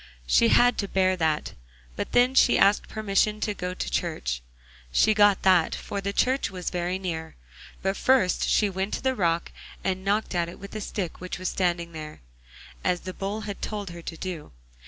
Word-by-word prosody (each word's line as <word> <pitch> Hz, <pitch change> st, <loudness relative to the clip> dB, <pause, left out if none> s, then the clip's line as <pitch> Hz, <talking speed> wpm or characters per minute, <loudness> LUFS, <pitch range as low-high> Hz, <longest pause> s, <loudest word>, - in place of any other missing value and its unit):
She -, -, +4 dB
had 245 Hz, -, +4 dB
to 200 Hz, -, -1 dB
bear 185 Hz, -1 st, +2 dB
that, 160 Hz, -3 st, 0 dB, 0.4 s
but -, -, -4 dB
then 245 Hz, +1 st, +4 dB
she 255 Hz, -, +5 dB
asked 200 Hz, +1 st, +4 dB
permission 215 Hz, 0 st, 0 dB
to 210 Hz, -, 0 dB
go 180 Hz, -2 st, -4 dB
to -, -, -4 dB
church. -, -, -2 dB, 0.5 s
She 215 Hz, -, +4 dB
got 205 Hz, -2 st, +4 dB
that, 185 Hz, -4 st, +4 dB
for 200 Hz, -, -5 dB
the 200 Hz, +1 st, -2 dB
church 260 Hz, +6 st, +1 dB
was 180 Hz, -2 st, -5 dB
very 180 Hz, +1 st, -1 dB
near. 165 Hz, -4 st, -5 dB, 0.5 s
But 195 Hz, +1 st, 0 dB
first 255 Hz, -9 st, +2 dB
she 210 Hz, -, +3 dB
went 190 Hz, +1 st, -2 dB
to -, -, -7 dB
the 260 Hz, 0 st, +2 dB
rock 170 Hz, -6 st, 0 dB, 0.3 s
and 190 Hz, 0 st, -1 dB
knocked 205 Hz, +2 st, 0 dB
at 170 Hz, -1 st, 0 dB
it 170 Hz, -, -10 dB
with 200 Hz, 0 st, -10 dB
the 215 Hz, -, -5 dB
stick 190 Hz, -5 st, -4 dB
which 185 Hz, -, -5 dB
was 185 Hz, 0 st, -2 dB
standing 175 Hz, -2 st, -1 dB
there, 155 Hz, -, -8 dB, 0.6 s
as 180 Hz, -1 st, +1 dB
the 185 Hz, -, -6 dB
Bull 200 Hz, +3 st, -4 dB
had 205 Hz, -2 st, -6 dB
told 205 Hz, -4 st, -4 dB
her 170 Hz, 0 st, -9 dB
to 165 Hz, 0 st, -7 dB
do. 175 Hz, -, -6 dB
185 Hz, 200 wpm, -26 LUFS, 170-205 Hz, 0.6 s, she